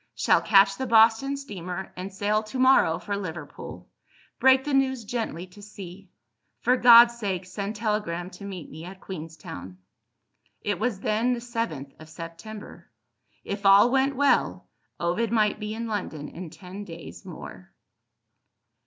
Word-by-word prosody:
Shall - - +3
catch 195 -1 +5
the 260 - -2
Boston 230 +4 +4
steamer, 190 -8 -6
and 185 +2 -6
sail 205 +2 0
to 215 +4 -7
morrow 255 -11 +5
for 205 - -4
Liverpool. 165 -6 -7 0.5
Break 265 0 +5
the 290 - -3
news 265 -3 +1
gently 205 -7 -3
to 185 +3 -16
C. 195 -2 -11 0.5
For 250 +2 +3
God's 235 -1 +8
sake 190 -4 -2
send 200 +3 -5
telegram 210 -5 -2
to 200 - -12
meet 190 -5 -7
me 160 +2 -9
at 185 +2 -10
Queenstown." 155 - -8 0.9
It 205 - -1
was 220 -3 -1
then 225 +5 +1
the 240 - -3
7th 230 - -4
of 155 0 -13
September. 170 +6 -10 0.5
If 200 0 -5
all 200 +4 +7
went 270 +1 +2
well, 285 +2 +2 0.3
Ovid 180 +7 0
might 215 -2 +2
be 210 0 -4
in 230 +1 -4
London 185 -9 -4
in 175 -1 -8
ten 190 +4 -9
days 165 -4 -10
more. - - -10
205 Hz, 150 wpm, -26 LUFS, 180-230 Hz, 0.9 s, God's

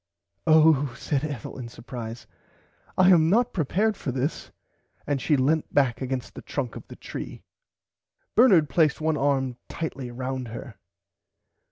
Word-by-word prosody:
Oh 155 -4 +5
said 145 -2 -1
Ethel 145 -5 -5
in 120 -2 -6
supprise 115 -1 -8 0.7
I 185 0 +6
am 165 -3 +5
not 240 +5 +2
prepared 200 +7 +1
for 140 - -4
this 135 +5 -3 0.6
and 145 -2 -1
she 150 - +2
lent 150 +4 +1
back 135 -4 +2
against 130 -1 -3
the - - -9
trunk 130 -5 -4
of - - -9
the - - -10
tree. - - -8 0.9
Bernard 195 - +6
placed 155 -1 +2
one 160 0 +1
arm 135 -3 0
tightly 140 -6 -5
round 130 +1 -4
her. 115 0 -8
140 Hz, 145 wpm, -26 LUFS, 125-160 Hz, 0.9 s, I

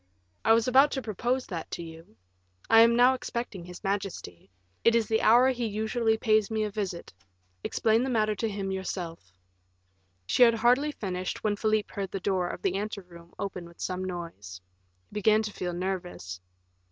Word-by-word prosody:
"I 225 - +5
was 230 +1 +3
about 270 +3 +6
to 265 - -2
propose 240 +4 -1
that 170 -4 -6
to 170 - -5
you. 160 -8 -12 0.5
I 225 - +9
am 230 0 +6
now 250 +2 +6
expecting 235 -7 -5
his 180 +2 -11
majesty; 195 - -4 0.3
it 230 - +5
is 230 -2 +2
the 220 0 +1
hour 245 +4 +6
he 245 -2 -2
usually 220 +2 0
pays 215 -2 +2
me 220 -1 0
a 210 - -2
visit; 195 -4 -4 0.5
explain 225 +1 +2
the 265 - -1
matter 215 -3 +2
to 225 - -1
him 195 -2 -3
yourself." 175 - -5 0.9
She 250 - 0
had 230 -2 +7
hardly 250 +6 +3
finished 185 -8 -4
when 210 -1 +1
Philip 215 0 0
heard 195 -2 -4
the 195 - -4
door 185 -1 0
of - - -7
the 190 -1 +1
ante 205 0 -4
room 170 -1 -16
open 185 -3 -5
with 170 - -18
some 185 0 -3
noise. 165 - -7 0.5
He - - -22
began 215 +1 +3
to 210 -1 -5
feel 180 - -3
nervous. 175 - -4
205 Hz, 185 wpm, -28 LUFS, 180-225 Hz, 0.9 s, I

